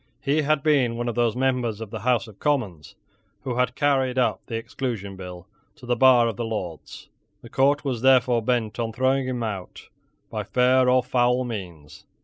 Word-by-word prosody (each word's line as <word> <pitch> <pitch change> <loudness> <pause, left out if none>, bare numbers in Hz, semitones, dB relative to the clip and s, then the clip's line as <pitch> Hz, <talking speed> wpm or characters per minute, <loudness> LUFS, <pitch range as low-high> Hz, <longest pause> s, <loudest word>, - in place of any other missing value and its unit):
He 145 +3 +1
had 150 -1 +1
been 130 -7 +2
one 120 0 -3
of 120 - -1
those 120 -1 +1
members 125 -4 0
of 110 -2 -8
the 110 - -5
House 120 -1 +1
of 105 -3 -15
Commons 100 - -2 0.5
who 130 -2 -3
had 125 0 0
carried 135 -3 +1
up 125 - +1
the 115 - -5
Exclusion 115 -4 -4
Bill 90 -1 -9 0.3
to 125 - -14
the 120 0 0
bar 125 -1 +5
of 110 -4 -4
the - - -2
Lords. 100 -8 -6 0.4
The - - -11
court 140 +2 +2
was 125 -5 -2
therefore 125 -2 +4
bent 115 -1 -1
on 115 -1 -2
throwing 130 +2 +1
him 125 -2 -3
out 100 -5 -6 0.4
by - - -3
fair 125 0 +3
or 125 0 +3
foul 125 +1 +1
means. 90 -11 -8
120 Hz, 190 wpm, -24 LUFS, 110-130 Hz, 0.5 s, bar